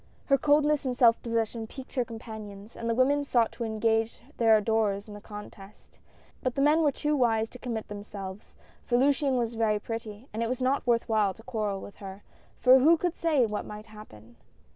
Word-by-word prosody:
Her 275 Hz, -, +4 dB
coldness 295 Hz, 0 st, +3 dB
and 255 Hz, -2 st, -2 dB
self 235 Hz, -2 st, +5 dB
possession 230 Hz, -1 st, -2 dB
piqued 265 Hz, +3 st, -11 dB
her 255 Hz, -, +1 dB
companions, 220 Hz, -2 st, -9 dB
and 230 Hz, -, -4 dB
the 230 Hz, -, +1 dB
women 280 Hz, +4 st, +3 dB
sought 240 Hz, -5 st, +2 dB
to 235 Hz, -, -6 dB
engage 225 Hz, 0 st, 0 dB, 0.2 s
their 225 Hz, -2 st, +5 dB
adorers 210 Hz, -2 st, 0 dB
in 210 Hz, -, -10 dB
the 205 Hz, -, -10 dB
contest; 205 Hz, -1 st, -12 dB, 0.4 s
but 255 Hz, -1 st, -2 dB
the 275 Hz, -, 0 dB
men 300 Hz, +3 st, +4 dB
were 300 Hz, -3 st, +3 dB
too 300 Hz, +2 st, -1 dB
wise 225 Hz, -4 st, +2 dB
to 250 Hz, -, -12 dB
commit 230 Hz, -3 st, -4 dB
themselves, 205 Hz, -1 st, -8 dB, 0.3 s
for 240 Hz, -, +1 dB
Luciane 275 Hz, 0 st, +2 dB
was 235 Hz, -1 st, -1 dB
very 220 Hz, -2 st, +1 dB
pretty, 225 Hz, +1 st, -7 dB
and 220 Hz, -, -3 dB
it 230 Hz, -, 0 dB
was 255 Hz, -, -2 dB
not 260 Hz, +1 st, 0 dB
worth 235 Hz, -1 st, +2 dB
while 210 Hz, -4 st, +1 dB
to 225 Hz, -, -16 dB
quarrel 215 Hz, -5 st, -3 dB
with 205 Hz, -, -11 dB
her, 195 Hz, 0 st, -9 dB, 0.3 s
for 255 Hz, +1 st, +6 dB
who 320 Hz, +6 st, +5 dB
could 350 Hz, +1 st, -1 dB
say 305 Hz, -7 st, +2 dB
what 210 Hz, -1 st, -3 dB
might 210 Hz, 0 st, -9 dB
happen 120 Hz, -, -14 dB
230 Hz, 205 wpm, -28 LUFS, 210-255 Hz, 0.4 s, for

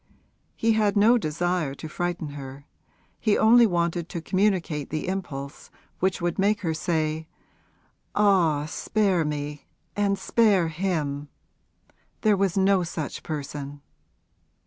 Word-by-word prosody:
He 225 Hz, -, +2 dB
had 210 Hz, -2 st, +2 dB
no 230 Hz, +4 st, +5 dB
desire 170 Hz, -3 st, -1 dB
to 160 Hz, -, -8 dB
frighten 175 Hz, -1 st, -3 dB
her; 140 Hz, -1 st, -9 dB, 0.5 s
he 215 Hz, -2 st, +2 dB
only 230 Hz, +2 st, +6 dB
wanted 170 Hz, -2 st, -1 dB
to 175 Hz, -, -4 dB
communicate 180 Hz, -5 st, 0 dB
the 155 Hz, +2 st, -3 dB
impulse 150 Hz, -7 st, -5 dB, 0.3 s
which 190 Hz, 0 st, +1 dB
would 175 Hz, 0 st, -2 dB
make 205 Hz, +3 st, +2 dB
her 165 Hz, -4 st, -1 dB
say, 155 Hz, -1 st, -1 dB, 0.9 s
'Ah, 175 Hz, -8 st, +3 dB
spare 190 Hz, +2 st, 0 dB
me 150 Hz, -1 st, -4 dB, 0.3 s
and 200 Hz, -1 st, +1 dB
spare 200 Hz, -8 st, +3 dB
him! 155 Hz, -5 st, -2 dB, 0.9 s
There 215 Hz, -2 st, +4 dB
was 195 Hz, -1 st, 0 dB
no 195 Hz, 0 st, +4 dB
such 165 Hz, -3 st, -4 dB
person.' 145 Hz, -1 st, -6 dB
175 Hz, 125 wpm, -25 LUFS, 150-200 Hz, 0.9 s, only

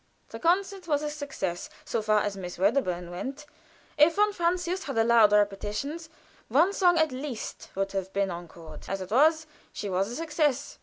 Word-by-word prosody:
The -, -, -8 dB
concert 375 Hz, +2 st, 0 dB
was 295 Hz, -2 st, +1 dB
a 300 Hz, -, -2 dB
success, 275 Hz, -, -4 dB, 0.2 s
so -, -, -1 dB
far 215 Hz, 0 st, +2 dB
as 205 Hz, -1 st, -2 dB
Miss 180 Hz, -2 st, -7 dB
Wedderburn 180 Hz, -4 st, 0 dB
went. 265 Hz, +11 st, -6 dB, 0.5 s
If 310 Hz, +3 st, +6 dB
von 420 Hz, 0 st, +3 dB
Francius 355 Hz, +1 st, -1 dB
had 275 Hz, -, -4 dB
allowed 225 Hz, -2 st, +5 dB
repetitions, 210 Hz, +10 st, 0 dB, 0.4 s
one 325 Hz, -, +3 dB
song 355 Hz, -3 st, +4 dB
at 315 Hz, -2 st, +3 dB
least 255 Hz, -2 st, -6 dB
would 195 Hz, 0 st, -1 dB
have 195 Hz, -1 st, -3 dB
been 195 Hz, -1 st, 0 dB
encored. 170 Hz, -2 st, -10 dB
As 195 Hz, 0 st, -3 dB
it 185 Hz, -, -7 dB
was, 315 Hz, +6 st, +4 dB, 0.3 s
she 205 Hz, -, -5 dB
was 190 Hz, +3 st, 0 dB
a 240 Hz, -, -6 dB
success. 305 Hz, -3 st, -1 dB
255 Hz, 175 wpm, -27 LUFS, 195-320 Hz, 0.5 s, If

